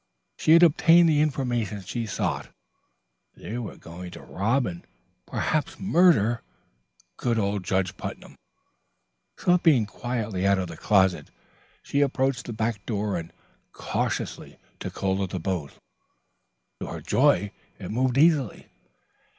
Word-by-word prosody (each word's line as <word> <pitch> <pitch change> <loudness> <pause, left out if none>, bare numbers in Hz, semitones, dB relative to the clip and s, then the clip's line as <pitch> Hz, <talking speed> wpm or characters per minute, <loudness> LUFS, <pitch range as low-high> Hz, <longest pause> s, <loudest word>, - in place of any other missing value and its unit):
She 155 - +3
had 170 +1 +7
obtained 170 +1 +6
the 150 -2 +3
information 120 -8 -1
she 115 +3 -4
sought. - - -2 0.9
They 115 +3 -6
were 115 - -7
going 90 +2 -9
to - - -10
rob 115 +7 0
and 85 -4 -5 0.5
perhaps 155 -1 -1
murder 165 - +3 0.8
good 120 -2 0
old 100 -2 -1
Judge 95 -1 -1
Putnam. - - -8 1.0
Slipping 165 -9 +3
quietly 105 -4 -3
out 100 0 +4
of 90 -2 -3
the 85 - -7
closet, 95 -5 +2 0.5
she 140 - 0
approached 135 -2 0
the - - -4
back 110 -2 -2
door 105 -3 -1
and 85 -1 -5 0.4
cautiously - - -3 0.2
took - - -7
hold 95 0 0
of 95 - -2
the 90 - -4
bolt. 85 -5 -3 1.0
To - - -5
her - - -6
joy 100 -1 +2 0.3
it - - -7
moved 125 +2 +1
easily. 150 -5 +2
110 Hz, 135 wpm, -26 LUFS, 95-135 Hz, 1.0 s, had